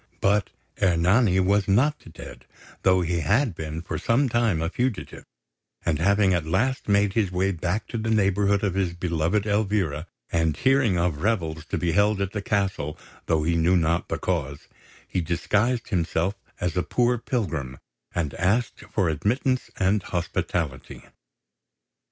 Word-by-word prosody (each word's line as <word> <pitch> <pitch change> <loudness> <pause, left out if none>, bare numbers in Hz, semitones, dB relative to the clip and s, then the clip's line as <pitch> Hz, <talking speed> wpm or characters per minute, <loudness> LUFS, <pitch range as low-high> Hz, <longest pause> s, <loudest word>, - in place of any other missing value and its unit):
But 100 -1 +2 0.3
Ernani 95 +3 +3
was 100 +2 +2
not 125 - +1
dead, - - -11 0.4
though 95 -1 +4
he 85 0 0
had 105 - +2
been 80 0 -6
for - - -4
some 130 +4 +2
time 115 -7 +1
a 80 - -1
fugitive; 120 +4 -3 0.6
and 80 -3 +1
having 100 +2 +3
at 85 -3 -1
last 120 +10 0
made 100 -1 +3
his 105 -5 +1
way 95 +2 +1
back 90 +4 -2
to 115 - -3
the 110 +1 -2
neighbourhood 100 -1 +2
of 100 -3 +1
his 90 -3 -1
beloved 85 +3 0
Elvira, 100 -7 0 0.2
and 80 -2 +1
hearing 130 -7 +3
of 85 -4 0
revels 80 -7 -1
to - - -3
be 85 -1 0
held 100 +3 +2
at 100 -1 -1
the 105 - -3
castle, 95 -8 -1 0.3
though 80 -2 +2
he 85 +2 +1
knew 85 +3 +3
not 85 0 0
the - - -1
cause, 75 -6 -3 0.4
he 90 - -1
disguised 105 +8 0
himself 85 -1 0 0.3
as 90 -2 -2
a 90 - +2
poor 120 +8 +1
pilgrim, 80 - -3 0.4
and 80 -5 -1
asked 110 +9 0
for 95 -4 +1
admittance 125 - 0
and 95 +2 +2
hospitality. 85 -5 -3
95 Hz, 155 wpm, -25 LUFS, 85-105 Hz, 0.6 s, though